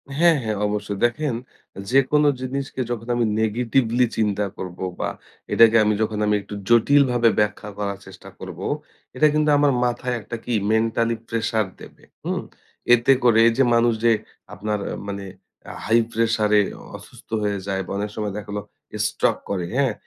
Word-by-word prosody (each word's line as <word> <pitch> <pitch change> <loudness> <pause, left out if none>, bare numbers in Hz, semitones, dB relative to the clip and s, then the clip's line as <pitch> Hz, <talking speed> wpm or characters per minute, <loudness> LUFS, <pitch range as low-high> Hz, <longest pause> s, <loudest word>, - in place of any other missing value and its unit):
হ্যাঁ, 165 +1 +4
হ্যাঁ 110 -2 -2
অবশ্যই। 105 -1 -3
দেখেন 140 +2 -1 0.4
অ্যা 100 - -8
যেকোনো 135 +3 +4
জিনিসকে 130 0 -4
যখন 115 0 -4
আমি 120 -1 +1 0.2
নেগেটিভলি 120 +2 +1
চিন্তা 105 -2 +1
করবো 90 0 -5
বা - - -1 0.4
এটাকে 115 -1 +6
আমি 105 0 +2
যখন 110 -1 -1
আমি 105 0 +2
একটু 100 - -11 0.2
জটিলভাবে 120 0 +4
ব্যাখ্যা 105 0 -1
করার 100 -1 -3
চেষ্টা - - -12
করব, - - -8 0.6
এটা 155 +4 +5
কিন্তু 150 0 +2
আমার 145 -1 +4
মাথায় 125 +1 -1
একটা 115 - -7
কি? 120 - -2 0.2
mentally 115 +1 +1
pressure 110 -2 -1
দেবে, - - -14 0.2
হুম? - - -2 0.5
এতে 120 +3 +5
করে 115 -2 +5
এই - - +4
যে 135 - +5
মানুষ 115 0 +3
যে 115 - +6 0.4
আপনার 105 +1 -3
আ - - -4
মানে 100 0 -5 0.5
আ - - -8
high 115 +1 +4
pressure 115 -2 +1
এ - - +6 0.3
অসুস্থ - - -14
হয়ে 100 -1 -1
যায় 95 -1 -1
বা - - -8
অনেক 105 +1 -2
সময় 105 -2 -3
দেখা 105 0 -7
লো - - -2 0.4
স্ট্রোক - - +1
করে, 95 -3 -2
হ্যাঁ? 135 -5 +2
115 Hz, 170 wpm, -22 LUFS, 105-125 Hz, 0.6 s, এটাকে